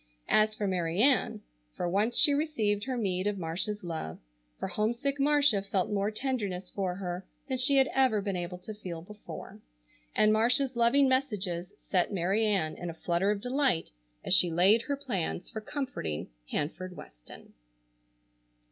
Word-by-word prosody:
As 215 0 +3
for 210 - -3
Mary 175 -2 -1
Ann, 265 +3 +3 0.3
for - - -2
once 205 +7 +1
she 290 - +7
received 225 -9 0
her 260 -2 -2
meed 190 -3 0
of 210 -1 -1
Marcia's 185 +5 -2
love, 160 - -5 0.4
for - - -3
homesick 240 +6 -1
Marcia 285 -7 +4
felt 195 0 -1
more 200 0 0
tenderness 210 -6 -3
for 185 -3 -2
her 180 -1 -5 0.2
than 260 -2 -2
she 275 +2 +4
had 270 0 +5
ever 260 -5 +3
been 200 -1 -3
able 175 0 -4
to 200 +4 -8
feel 180 -6 -7
before; 210 +3 -10 0.5
and 215 0 +4
Marcia's 250 +4 +3
loving 240 +4 +4
messages 205 -10 -1
set 180 0 0
Mary 195 +3 +1
Ann 190 -8 +1
in 175 - -5
a 165 - -7
flutter 175 +4 0
of 205 -1 0
delight, 255 - 0 0.3
as - - +3
she 180 -1 +8
laid 190 +7 +4
her 280 +3 -3
plans 195 -10 -3
for 220 - -5
comforting 215 - -4 0.2
Hanford 180 +4 -3
Weston. - - -13
205 Hz, 165 wpm, -29 LUFS, 180-250 Hz, 0.5 s, she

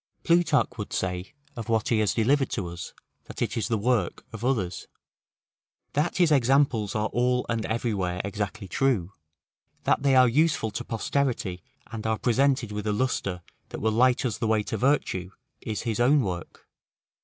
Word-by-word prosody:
Plutarch 165 -7 +2
would 105 - -5
say 90 0 -2 0.2
of 115 -2 -6
what 110 -1 +1
he 115 - +2
has 105 -3 +1
delivered 135 +4 +2
to 95 - -3
us, 85 +1 -7 0.3
that - - -9
it - - -1
is 110 -4 -1
the 115 - 0
work 110 -4 0
of - - -7
others: 105 -9 -1 1.1
that 150 +4 0
his 175 -3 +4
examples 130 -5 +3
are 105 0 +1
all 125 +1 +1
and 115 -1 -1
everywhere 100 -6 -1
exactly 100 0 -4
true: 100 -4 0 0.7
that - - +2
they 135 -1 +3
are 130 -1 +7
useful 145 -3 +2
to - - -4
posterity, 115 -6 -1 0.3
and 110 -1 -4
are 110 0 +1
presented 130 -1 +1
with 105 0 -4
a - - +2
lustre 100 -6 -1 0.3
that - - -6
will 110 - +1
light 125 +3 +3
us 115 -3 -2
the 115 - 0
way 110 -1 +2
to - - -4
virtue, 120 -9 0 0.3
is 110 -2 -4
his 115 -2 -2
own 135 +4 +5
work. 90 -6 -5
115 Hz, 175 wpm, -26 LUFS, 105-130 Hz, 1.1 s, are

